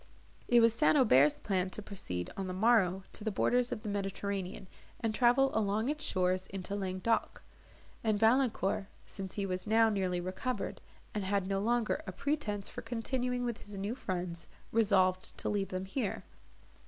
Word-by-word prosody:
It 240 -1 +6
was 230 -1 +5
St. 300 +5 +4
Aubert's 150 - +5
plan 185 -2 0
to 200 - -6
proceed, 90 - -5
on 195 -1 -3
the 185 - -4
morrow, 195 -3 +3
to - - -6
the 220 - 0
borders 245 +4 +1
of 215 - -4
the 215 - -3
Mediterranean, 195 -1 -3 0.3
and 225 -2 -1
travel 255 +4 +4
along 220 +3 +1
its 300 +1 -2
shores 185 -3 0
into 195 +1 -5
Languedoc; 190 +3 -1 0.6
and 215 -2 +1
Valancourt, 225 -4 +2 0.2
since 190 -2 -7
he 200 - -1
was 185 +1 -3
now 225 +1 +5
nearly 185 -4 0
recovered, 185 +8 -3 0.3
and 210 - -2
had 195 0 0
no 195 0 0
longer 235 +6 +1
a - - -3
pretence 280 -9 -2
for 245 - -6
continuing 245 +2 -2
with 235 -2 -3
his 205 -1 -7
new 200 +3 -2
friends, 180 -7 -4 0.2
resolved 190 -4 +2
to - - -2
leave 200 -2 0
them 185 0 -3
here. 210 +2 -3
205 Hz, 170 wpm, -32 LUFS, 190-230 Hz, 0.6 s, It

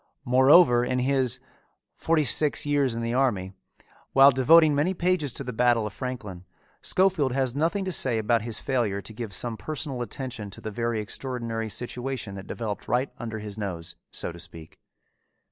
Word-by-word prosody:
Moreover 130 0 +6
in 125 +1 -1
his 130 -1 +1 0.6
Forty 160 -2 +1
six 150 +2 +2
Years 140 -4 +1
in 115 - -3
the 115 0 -2
Army, 105 -8 0 0.6
while 135 +1 +8
devoting 155 +4 +5
many 155 +7 +1
pages 175 -5 0
to - - -6
the 125 - -5
Battle 120 -1 +2
of 105 - -5
Franklin, 110 -9 -6 0.4
Schofield 180 -9 +2
has 130 -2 0
nothing 170 +7 0
to 185 - -2
say 130 -8 +1
about 115 +1 +1
his 115 0 -3
failure 120 -7 -1
to 110 - -7
give 110 -1 -6
some 115 +4 -3
personal 145 -3 -4
attention 120 -2 -5
to 100 - -11
the 110 - -5
very 115 +1 -1
extraordinary 115 0 -4
situation 120 0 -4
that 95 0 -9
developed 105 -4 -5
right 125 +3 0
under 115 -2 -5
his 105 0 -6
nose, 90 -5 -4
so - - -4
to 85 - -11
speak. 85 -2 -10
125 Hz, 175 wpm, -26 LUFS, 110-135 Hz, 0.6 s, while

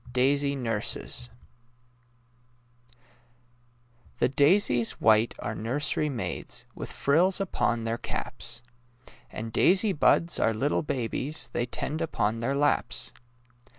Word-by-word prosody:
DAISY 140 +2 +2
NURSES 115 - -1 2.9
The - - +2
daisies 140 - +3
white 110 +1 +3
are 105 - -4
nursery 140 +7 -1
maids, 95 - -4
With - - -6
frills 175 +8 +2
upon 120 -11 0
their 115 +1 -2
caps; 115 - -5 0.7
And 110 0 -6
daisy 195 +3 +4
buds 170 +2 +3
are 110 - +2
little 140 +7 0
babies 135 +2 -3
They 120 - -2
tend 155 +6 -4
upon 115 -8 -1
their 135 +4 -1
laps. 140 -4 0
130 Hz, 105 wpm, -27 LUFS, 115-150 Hz, 2.9 s, daisy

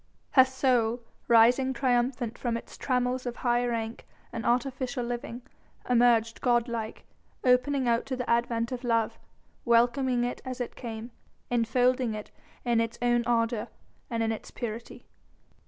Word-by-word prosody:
Her 260 -2 +7
soul 250 -3 +1 0.2
rising 245 +3 +5
triumphant 245 -2 0
from 235 -1 -2
its - - -10
trammels 250 -1 -1
of 240 - -3
high 240 -1 +1
rank 230 -1 -4 0.3
and 225 - -4
artificial 250 +1 0
living 240 0 -5 0.4
emerged 235 -2 +3
god 240 -2 +2
like, 225 -2 -5 0.4
opening 255 +1 +3
out 235 0 +1
to 260 - -2
the 250 -1 -4
advent 235 0 +1
of 250 0 -4
love, 230 -2 0 0.4
welcoming 240 +1 +3
it 245 - -3
as 255 0 -6
it 245 - -4
came, 230 -1 -7 0.4
enfolding 245 0 +2
it 210 - -8 0.3
in 235 -1 +3
its 230 +1 -3
own 240 0 +2
ardour 230 -1 +1 0.4
and 230 -1 -1
in 225 - +1
its 220 - -6
purity. 230 0 -7
240 Hz, 145 wpm, -28 LUFS, 230-250 Hz, 0.4 s, Her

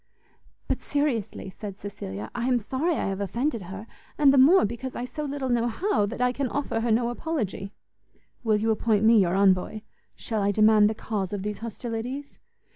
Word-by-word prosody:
"But - - -1
seriously," 235 -10 -2
said 200 0 -8
Cecilia, 105 - -7
"I 240 0 -2
am 255 -1 +3
sorry 265 - -1
I - - -1
have 195 0 -2
offended 235 - -1
her, 190 +4 -8 0.3
and 285 -2 +6
the 275 - +5
more 315 - +7
because 240 +4 -5
I 245 - -3
so 300 +4 -5
little 280 -2 -3
know 240 -1 +2
how, 240 - 0
that 230 - -6
I 250 0 +3
can 270 +1 -2
offer 280 -4 -2
her 235 +1 -1
no 235 +2 +2
apology." 235 - -3 0.7
"Will 220 -2 +3
you 220 +2 +1
appoint 215 -1 +1
me 225 0 +7
your 180 -1 +1
envoy? 195 +2 +2 0.3
Shall 220 -2 -3
I 200 - +2
demand 215 0 +5
the 220 - -3
cause 205 -4 -3
of 200 -2 -3
these 210 -1 -4
hostilities?" 235 +4 -5
225 Hz, 195 wpm, -26 LUFS, 205-260 Hz, 0.7 s, more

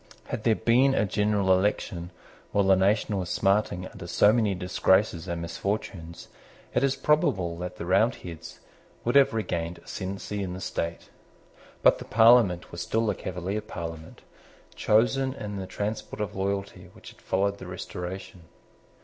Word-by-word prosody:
Had 110 - -4
there 115 -2 +4
been 130 +5 +3
a 105 - +2
general 105 -1 +2
election 95 -2 -1 0.4
while 100 - +2
the 95 0 +5
nation 100 +3 +2
was 90 -1 -4
smarting 95 -2 +1
under - - -10
so 105 - +4
many 110 -4 +1
disgraces 90 0 +1
and 85 -1 -3
misfortunes, 85 -1 -4 0.5
it - - +2
is 135 -1 +2
probable 130 - +1
that 90 0 -5
the 85 - -6
Roundheads 90 -4 -1 0.4
would 120 - +1
have 140 -1 +6
regained 85 -6 -2
ascendency 100 +2 -5
in 95 -2 -3
the 90 - -6
state. 85 -2 -4 0.7
But - - +5
the - - -8
Parliament 110 -6 +5
was - - -6
still 115 +1 0
the 105 - +1
Cavalier 95 +3 -4
Parliament, 85 -6 -8 0.5
chosen 130 +5 +2
in 105 -4 -6
the 95 -1 -5
transport 105 +2 -4
of 105 -1 -3
loyalty 95 -1 -3
which - - -13
had - - -21
followed 100 +1 0
the 95 - -9
Restoration. 90 0 -7
100 Hz, 155 wpm, -27 LUFS, 90-110 Hz, 0.7 s, have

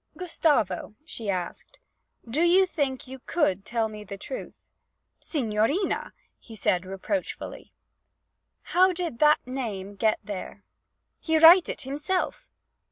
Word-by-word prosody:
'Gustavo,' 290 - 0
she 225 -9 -6
asked, 185 - -4 0.5
'do 265 +8 -1
you 355 +3 +5
think 280 -7 -2
that - - -17
you 265 - -8
could 200 - +1
tell 230 0 -1
me 210 -1 -9
the 200 -1 -8
truth?' - - -8 0.5
'Signorina!' 260 - -1 0.3
he 225 - -12
said 185 -3 0
reproachfully. 195 +10 -4 0.9
'How 370 +1 +4
did 335 -9 -4
that 300 0 +4
name 220 -7 -4
get 220 +1 +2
there?' 200 0 -7 0.6
'He 320 -1 +1
write 335 +3 +8
it - - -4
heemself!' 300 - -2
260 Hz, 125 wpm, -26 LUFS, 210-330 Hz, 0.9 s, write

